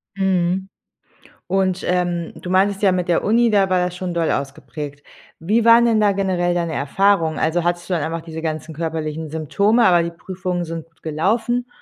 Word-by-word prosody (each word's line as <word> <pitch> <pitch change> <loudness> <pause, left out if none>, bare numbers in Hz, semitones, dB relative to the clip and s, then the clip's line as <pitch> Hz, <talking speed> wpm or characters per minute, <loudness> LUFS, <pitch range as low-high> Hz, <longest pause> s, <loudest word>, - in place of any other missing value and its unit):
Mhm. 190 0 0 0.8
Und, 190 -1 0
ähm, 175 -2 -1
du 180 - -6
meintest 195 +2 +2
ja 195 - +4
mit 180 -1 -1
der 175 - +1
Uni, 230 +2 +3
da 195 -2 +3
war 185 -1 +2
das 180 0 -4
schon 180 -1 -4
doll 165 -1 +1
ausgeprägt. 140 +1 -5 0.3
Wie 215 +8 +1
waren 230 +1 +6
denn 225 -2 +3
da 210 -1 +4
generell 185 -3 0
deine 170 -2 -1
Erfahrungen? 165 +2 +1
Also, 165 +2 0
hattest 175 +1 -2
du 185 - 0
dann 165 - 0
einfach 165 0 -3
diese 160 -1 -7
ganzen 160 0 -4
körperlichen 160 -1 -4
Symptome, 200 - +2
aber 175 -3 +5
die 170 0 -3
Prüfungen 180 +1 -4
sind 165 -1 -6
gut 165 - -37
gelaufen? 225 +10 0
175 Hz, 190 wpm, -20 LUFS, 160-195 Hz, 0.8 s, waren